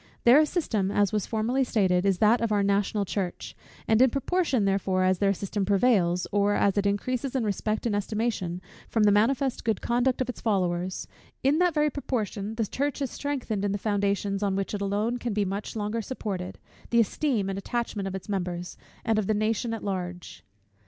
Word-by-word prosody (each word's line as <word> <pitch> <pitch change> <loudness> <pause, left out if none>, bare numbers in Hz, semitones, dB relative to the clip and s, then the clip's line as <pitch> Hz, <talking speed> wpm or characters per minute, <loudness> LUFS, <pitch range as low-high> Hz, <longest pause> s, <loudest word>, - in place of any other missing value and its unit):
Their 275 +6 +7
system, 220 - 0
as 205 0 +1
was 210 -2 0
formerly 235 +4 +1
stated, 190 -6 +2
is 195 -2 +2
that 220 +5 +4
of 230 -2 0
our 205 -1 +2
national 200 +1 +1
church: 185 -2 -4 0.3
and 220 +1 +4
in 260 - +7
proportion, 275 - 0
therefore, 195 -1 +1
as 185 0 +2
their 200 -1 +3
system 200 +1 -2
prevails, 190 -4 +2
or 205 0 +2
as 200 - +2
it 200 -1 +1
increases 250 +6 -1
in 260 - +1
respect 215 +1 -1
and 220 -3 +1
estimation, 205 -4 -2 0.3
from 225 - +2
the 205 - +6
manifest 250 +5 +2
good 220 -3 0
conduct 245 +2 +1
of 255 - 0
its 250 - -6
followers; 185 -4 -1 0.4
in 280 +4 +3
that 355 -2 +2
very 300 0 +2
proportion 220 -6 -3
the 225 -1 0
church 285 +7 -2
is 275 -3 -2
strengthened 255 -8 -3
in 200 -1 0
the - - 0
foundations, 200 -1 0
on 200 -2 0
which 195 +1 -2
alone 205 +4 -1
it - - -12
can 240 -3 -3
be 205 -1 +1
much 200 +4 -4
longer 215 +1 -2
supported, 195 -6 -5 0.3
the 235 - +3
esteem 230 -1 +1
and 195 0 -3
attachment 215 -2 -3
of 195 - -4
its 190 - -7
members, 180 -3 -3 0.3
and 225 -1 +2
of 205 - -2
the 215 - +2
nation 220 +2 0
at 225 - -4
large. 180 - -5
210 Hz, 200 wpm, -27 LUFS, 195-235 Hz, 0.4 s, Their